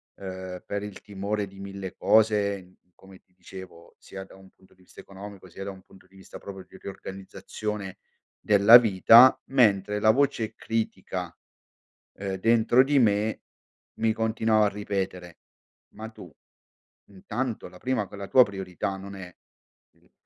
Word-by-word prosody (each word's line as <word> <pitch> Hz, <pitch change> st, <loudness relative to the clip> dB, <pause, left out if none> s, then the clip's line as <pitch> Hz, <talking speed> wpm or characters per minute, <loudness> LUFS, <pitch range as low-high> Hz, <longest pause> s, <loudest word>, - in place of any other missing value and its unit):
uhm, 95 Hz, -1 st, -8 dB
per 100 Hz, 0 st, -4 dB
il 105 Hz, -1 st, -8 dB
timore 100 Hz, +1 st, -3 dB
di 95 Hz, 0 st, -15 dB
mille 100 Hz, -1 st, -7 dB
cose, 100 Hz, -4 st, +1 dB, 0.2 s
come 95 Hz, -1 st, -17 dB
ti 90 Hz, -, -40 dB
dicevo, 90 Hz, -2 st, -12 dB
sia 95 Hz, 0 st, -9 dB
da 95 Hz, -, -16 dB
un 95 Hz, 0 st, -17 dB
punto 95 Hz, -, -26 dB
di 95 Hz, -, -27 dB
vista -, -, -17 dB
economico, 100 Hz, 0 st, -11 dB
sia 95 Hz, -, -9 dB
da -, -, -4 dB
un 95 Hz, -1 st, -14 dB
punto 95 Hz, -1 st, -20 dB
di 95 Hz, -, -25 dB
vista 95 Hz, -, -12 dB
proprio 95 Hz, -2 st, -10 dB
di -, -, -18 dB
riorganizzazione 95 Hz, +1 st, -7 dB, 0.4 s
della 105 Hz, +3 st, +8 dB
vita, 115 Hz, +3 st, +6 dB
mentre 105 Hz, -6 st, +2 dB
la 110 Hz, -, +3 dB
voce 115 Hz, -4 st, 0 dB
critica, 95 Hz, -6 st, -4 dB, 0.8 s
uhm, 95 Hz, -1 st, -5 dB
dentro 115 Hz, +4 st, +4 dB
di 145 Hz, +1 st, +1 dB
me 105 Hz, -2 st, +1 dB, 0.6 s
mi 110 Hz, 0 st, +2 dB
continuava 110 Hz, -1 st, +1 dB
a -, -, +2 dB
ripetere: 95 Hz, -4 st, -5 dB, 0.6 s
“Ma 110 Hz, +1 st, -8 dB
tu, 90 Hz, -6 st, -13 dB, 0.8 s
intanto, 110 Hz, +4 st, -5 dB
la 90 Hz, -, -15 dB
prima 120 Hz, -1 st, -2 dB
con 100 Hz, -, -11 dB
la 100 Hz, 0 st, -7 dB
tua 130 Hz, -, +7 dB
priorità 95 Hz, -2 st, -5 dB
non 100 Hz, +1 st, -9 dB
è 90 Hz, -2 st, -10 dB, 0.6 s
il -, -, -31 dB
100 Hz, 155 wpm, -26 LUFS, 95-110 Hz, 0.8 s, della